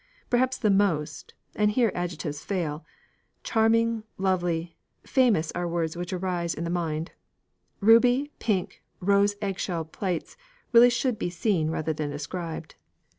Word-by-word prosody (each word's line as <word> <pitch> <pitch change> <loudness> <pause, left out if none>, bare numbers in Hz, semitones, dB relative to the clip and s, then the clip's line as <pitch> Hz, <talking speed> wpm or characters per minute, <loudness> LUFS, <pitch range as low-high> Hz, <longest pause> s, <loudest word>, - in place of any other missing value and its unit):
Perhaps 255 +1 +2
the 215 - +2
most 165 -7 0 0.2
and 210 0 +3
here 230 -3 +3
adjectives 165 -4 -4
fail: 165 -6 -2 0.6
charming, 230 0 +2 0.2
lovely, 175 -3 -1 0.3
famous 225 - +2
are 175 0 -2
words 170 -1 -2
which 175 0 -5
arise 180 -2 -2
in 165 - -4
the 170 - -2
mind 165 -2 -2 0.7
ruby, 245 +6 +5
pink, 200 -5 -1 0.2
rose 200 +2 +3
eggshell 185 -4 -2
plates 175 +1 -4 0.4
really 240 +1 +8
should 245 -2 0
be 175 - -1
seen 175 -2 0
rather 160 0 -1
than 150 -1 -3
described. 160 +2 -5
180 Hz, 130 wpm, -26 LUFS, 165-215 Hz, 0.7 s, really